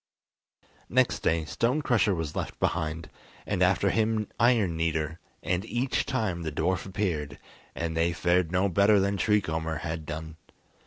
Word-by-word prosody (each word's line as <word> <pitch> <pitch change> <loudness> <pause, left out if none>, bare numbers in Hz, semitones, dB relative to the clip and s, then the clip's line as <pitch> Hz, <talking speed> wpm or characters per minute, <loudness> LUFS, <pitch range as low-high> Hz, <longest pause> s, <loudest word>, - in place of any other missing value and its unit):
Next - - +2
day 80 -1 +1
Stone 125 - 0
Crusher 110 -7 +2
was 80 -3 -4
left - - -4
behind, 80 -1 -1 0.4
and - - -2
after - - +3
him 110 -1 +1
Iron 115 -8 +3
Kneader, 80 -1 -1 0.2
and 90 +3 0
each 120 +3 -1
time 110 -10 -1
the 80 -2 -3
dwarf 90 +5 -1
appeared, 80 -8 -2 0.4
and 80 -1 -3
they 85 +1 +2
fared 85 0 +1
no 90 +2 +2
better 100 +3 +4
than 100 +1 +1
Tree 105 +2 +3
Comber 80 -1 -3
had 80 -1 -4
done. 80 +1 -6
90 Hz, 155 wpm, -28 LUFS, 80-105 Hz, 0.4 s, better